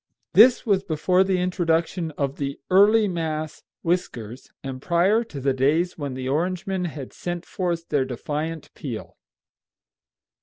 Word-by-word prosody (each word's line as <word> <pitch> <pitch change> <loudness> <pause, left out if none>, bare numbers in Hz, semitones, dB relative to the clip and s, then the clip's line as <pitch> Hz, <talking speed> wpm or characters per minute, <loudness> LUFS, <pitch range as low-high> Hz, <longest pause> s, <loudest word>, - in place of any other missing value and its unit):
This 245 +4 +7
was 200 -4 +2
before 180 +4 +2
the 190 -1 +1
introduction 170 -1 0
of 140 -1 -1
the 140 -1 -3
"early 210 +3 +6
mass" 155 -3 -3 0.2
whiskers, 130 - -2
and 130 -1 -6
prior 185 +8 +3
to 150 -11 -8
the 135 0 +1
days 155 +7 +1
when 140 -4 -4
the 130 0 -4
Orangemen 180 +5 -1
had 145 -6 -6
sent 175 -1 -5
forth 170 -3 -3
their 140 -2 +2
defiant 150 +5 -4
peal. 110 - -7
165 Hz, 140 wpm, -24 LUFS, 140-180 Hz, 0.2 s, This